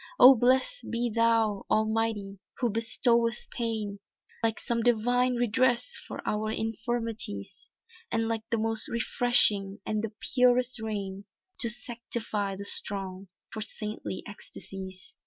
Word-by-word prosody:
"Oh 260 - +11
blest 260 - +1
be 235 0 -1
thou, 225 -3 +2
Almighty 215 -2 0 0.2
who 240 -3 0
bestowest 230 +1 +2
pain, 220 -4 -3 0.4
Like 225 -1 +1
some 235 -1 -1
divine 245 +2 +2
redress 245 - +2
for - - -7
our 215 +1 0
infirmities, 225 - -3 0.4
And 225 0 +1
like 225 -1 -1
the 230 - +1
most 225 0 +1
refreshing 220 -4 +2
and 215 0 -1
the 225 - -3 0.2
purest 250 -1 +3
rain, 200 -3 -4 0.3
To 235 - +4
sanctify 230 -4 -3
the 200 +1 -7
strong, 195 -1 -1 0.2
for 220 - -5
saintly 210 -3 -4
ecstasies." 190 -2 -9
225 Hz, 120 wpm, -28 LUFS, 205-240 Hz, 0.4 s, Oh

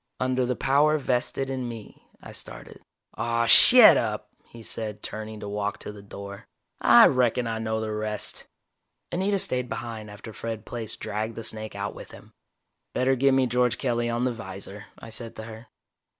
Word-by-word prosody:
"Under 130 0 0
the 125 - 0
power 145 +4 +3
vested 130 0 -1
in 130 -2 -3
me 115 -3 -11
" - - -27
I - - -9
started. - - -9 0.4
"Aw, 115 0 +1
shet - - +9
up," - - -3 0.2
he 115 -1 -13
said, 110 -2 -3
turning 110 0 -6
to 105 - -6
walk 105 0 -2
to - - -7
the 105 -1 -12
door. 100 0 -10 0.3
"I - - +8
reckon 125 -1 +2
I 115 -1 -2
know 110 0 -2
the 110 -1 -3
rest!" 105 0 -3 0.6
Anita 195 +3 +1
stayed 125 -8 -1
behind 110 -3 -6
after 105 +2 -10
Fred 115 -1 -6
Plaice 115 -3 -5
dragged 110 +2 -4
the 115 - -6
snake 110 -1 -4
out 100 +1 -4
with - - -11
him. - - -15 0.6
"Better 130 +1 +2
get 135 +1 +3
me 130 -1 +3
George 125 -1 +1
Kelly 120 -2 -1
on 120 +1 0
the 125 - 0
'visor," 100 -1 -8
I 115 - -11
said 115 0 -6
to 110 - -7
her. 110 +1 -10
115 Hz, 185 wpm, -26 LUFS, 110-125 Hz, 0.6 s, shet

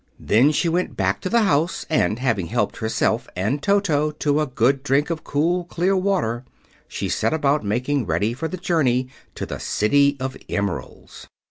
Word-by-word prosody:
Then 125 +8 +4
she 160 +3 0
went 175 +2 -1
back - - 0
to 185 - -3
the 235 +1 +3
house, 170 -2 +1
and 150 -8 +1
having 115 -9 0
helped 110 -1 -1
herself 110 0 0
and 110 +11 -1
Toto 165 -6 +2
to 150 0 0
a 150 - 0
good 130 +2 +1
drink 145 +3 +1
of 165 - -2
the - - -31
cool, 170 +5 0
clear 180 +3 0
water, 185 - 0 0.4
she - - -4
set - - 0
about 145 -2 +1
making 125 +4 -1
ready 90 +8 0
for 140 +6 -3
the 185 - -5
journey 135 -8 +1 0.3
to - - -4
the - - -6
City 140 +6 +2
of 130 0 -3
Emeralds. 100 -3 -4
145 Hz, 185 wpm, -22 LUFS, 120-165 Hz, 0.4 s, Then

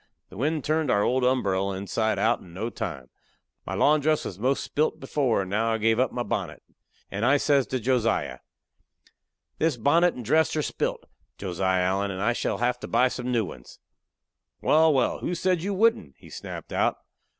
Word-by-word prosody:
The - - -12
wind 150 +2 -1
turned 155 0 0
our 100 - +3
old 130 +4 +1
umberell 100 -7 +1
inside 110 +3 -1
out 115 +2 +2
in 85 -2 -15
no 110 +5 -3
time. 80 - -6 0.6
My - - -3
lawn 150 +1 +4
dress 155 +1 +1
was 95 - -6
most 130 +5 0
spilte 155 +2 -1
before, 135 -5 0
and 95 -1 -6
now 115 +2 +1
I - - +1
give 110 +1 +2
up 130 - +2
my 120 - -2
bonnet. - - -4 0.5
And 100 +2 -3
I 135 +4 +4
says 140 -2 +2
to 130 - -2
Josiah: 120 -1 0 1.2
"This 160 -5 +1
bonnet 165 +9 +3
and 125 - -7
dress 160 +7 +2
are 155 - 0
spilte, - - -3 0.3
Josiah 95 -1 0
Allen, 95 +2 0
and 95 -1 -5
I 115 +5 +1
shall - - -2
have 125 +1 0
to - - -7
buy 125 +1 +3
some 125 0 -4
new 115 -3 +1
ones." - - -11 0.8
"Wal, 160 +1 +4
wal! 135 -4 +1
who 180 - -2
said 180 0 +1
you 200 +2 -2
wouldn't?" 190 - +2
he - - -16
snapped - - -8
out. - - +1
125 Hz, 195 wpm, -26 LUFS, 100-150 Hz, 1.2 s, lawn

